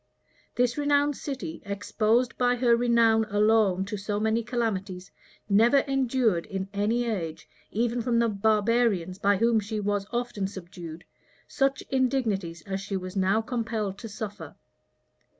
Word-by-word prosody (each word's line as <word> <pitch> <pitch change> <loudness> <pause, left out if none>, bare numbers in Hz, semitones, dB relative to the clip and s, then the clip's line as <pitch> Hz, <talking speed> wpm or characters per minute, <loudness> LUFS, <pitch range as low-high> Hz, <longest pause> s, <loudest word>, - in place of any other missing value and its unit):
This 245 +3 +1
renowned 290 0 +2
city, 255 - -6
exposed 215 +4 0
by 245 0 +2
her 240 -1 +4
renown 230 -2 +3
alone 210 -2 +2
to 210 +1 -4
so 205 +1 -3
many 220 +2 +1
calamities, 200 -6 -3 0.4
never 225 +6 +5
endured, 255 -9 0
in 190 0 -4
any 220 +4 0
age, 165 -8 -4 0.2
even 235 +2 0
from 235 0 0
the 235 0 +3
barbarians 210 -3 +1
by 200 0 +3
whom 230 +2 +3
she 215 +1 -4
was 205 -1 -1
often 240 -5 -2
subdued, 175 -3 -9 0.4
such 275 -1 0
indignities 225 -11 0
as 195 -1 -4
she 195 0 -3
was 185 0 -7
now 195 +3 +2
compelled 220 -4 -3
to 225 - -7
suffer. 205 0 -7
220 Hz, 140 wpm, -27 LUFS, 195-240 Hz, 0.4 s, never